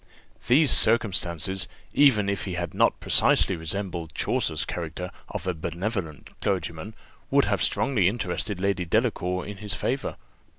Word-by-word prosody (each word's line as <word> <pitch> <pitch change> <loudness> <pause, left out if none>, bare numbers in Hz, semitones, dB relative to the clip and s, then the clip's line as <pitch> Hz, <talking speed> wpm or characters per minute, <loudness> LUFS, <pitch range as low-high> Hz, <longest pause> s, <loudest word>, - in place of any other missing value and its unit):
These 140 +2 +5
circumstances, 95 -5 +3 0.3
even 120 -8 +4
if 100 -1 -2
he 95 -3 -4
had 85 -2 -4
not - - +2
precisely 95 - +3
resembled 85 0 -4
Chaucer's - - 0
character 85 +1 -5 0.2
of 85 - -6
a 90 - -1
benevolent 85 0 -5
clergyman, 90 +1 -3 0.3
would - - +3
have - - -1
strongly 115 -10 +2
interested 100 -1 -2
Lady 95 -1 0
Delacour 90 -2 -1
in 105 0 -8
his 105 0 -4
favour. 135 +2 -2
95 Hz, 135 wpm, -25 LUFS, 85-105 Hz, 0.3 s, These